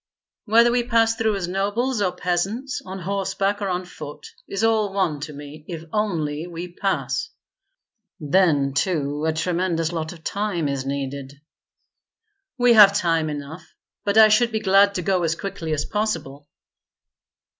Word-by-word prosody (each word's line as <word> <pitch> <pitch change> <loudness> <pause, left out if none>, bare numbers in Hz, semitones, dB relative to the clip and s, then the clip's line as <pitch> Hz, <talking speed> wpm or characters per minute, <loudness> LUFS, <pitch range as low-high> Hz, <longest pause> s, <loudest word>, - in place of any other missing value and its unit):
"Whether 230 +2 +5
we 245 0 +2
pass 230 -1 +2
through 220 -2 0
as 185 -3 -3
nobles 205 +6 -1
or 185 -3 +1
peasants, 190 +9 -2
on 190 +1 -7
horseback 195 +2 -2
or 200 - -1
on 180 0 -2
foot, 150 -4 -10 0.2
is 195 +2 -3
all 220 -3 +2
one 185 -7 0
to 150 +2 -6
me, 145 +1 -10
if 165 -3 -6
only 165 -7 -1
we 175 +1 -7
pass." 195 - -2 0.9
"Then 150 -4 +2
too 150 -2 -1
a - - +3
tremendous 170 0 -1
lot 160 -2 -3
of 165 -2 -13
time 200 -6 -2
is 135 -1 -3
needed." 140 0 -5 1.2
"We 245 -1 +5
have 205 -2 +8
time 165 -4 +1
enough, 150 +3 -8 0.3
but 200 +1 0
I 220 -1 +9
should 235 +3 +3
be 220 - -1
glad 200 -1 +4
to 180 - -2
go 185 0 +1
as 165 -1 0
quickly 165 -4 -5
as 150 -1 -1
possible." 155 -10 -3
180 Hz, 155 wpm, -23 LUFS, 155-205 Hz, 1.2 s, I